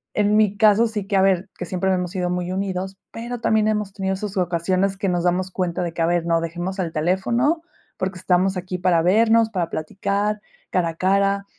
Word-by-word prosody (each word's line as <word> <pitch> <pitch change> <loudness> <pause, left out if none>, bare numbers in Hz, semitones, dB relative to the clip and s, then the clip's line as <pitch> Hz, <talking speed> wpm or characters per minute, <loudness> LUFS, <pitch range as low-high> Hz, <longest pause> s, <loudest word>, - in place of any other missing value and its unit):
en 210 0 +2
mi 205 -2 +2
caso, 215 +2 +5
sí 210 -3 -4
que, 200 - -1
a 190 - +4
ver, 190 0 +2
que 180 - -4
siempre 185 +2 -1
hemos 180 -1 -2
sido 180 -2 -2
muy 180 0 -2
unidos. 190 0 -3
Pero 240 +1 -6
también 220 -2 +2
hemos 210 -2 -1
tenido 190 -1 -2
sus 200 0 -5
ocasiones, 185 +2 0
que 195 -1 -1
nos 175 -1 0
damos 180 +1 +1
cuenta 180 -2 -2
de 170 - -3
que, 165 - -3
a - - +3
ver, 175 -1 +1
no, 165 -1 +2
dejemos 175 +3 -4
el 170 -3 -2
teléfono, 235 - +1 0.4
porque 185 0 -3
estamos 185 +1 +1
aquí 180 0 -4
para 175 -2 +3
vernos, 225 +4 +4
para 180 -5 -1
platicar 200 +6 -2 0.3
cara 175 -2 +1
a - - -5
cara. 195 +2 +1
190 Hz, 210 wpm, -22 LUFS, 180-205 Hz, 0.4 s, caso